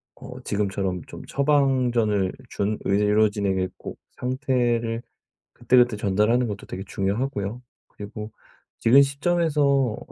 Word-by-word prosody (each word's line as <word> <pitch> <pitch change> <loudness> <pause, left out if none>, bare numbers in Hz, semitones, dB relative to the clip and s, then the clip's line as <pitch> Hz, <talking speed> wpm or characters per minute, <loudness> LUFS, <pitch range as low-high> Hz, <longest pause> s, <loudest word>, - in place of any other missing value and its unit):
어 - - -10
지금처럼 95 -3 -2
좀 - - -10
처방전을 125 -8 +2 0.2
준 105 +1 -2
의료진에게 100 -2 +2
꼭 - - -9 0.2
상태를 120 -3 -1 0.5
그때그때 120 -1 +3
전달하는 105 +5 +2
것도 100 -3 -6
되게 95 - -6
중요하고요. 100 +3 -2 0.3
그리고 105 +1 -8 0.5
지금 130 +5 +6
시점에서 150 +2 +1
어 135 -5 +2
115 Hz, 280 characters per minute, -24 LUFS, 100-130 Hz, 0.5 s, 지금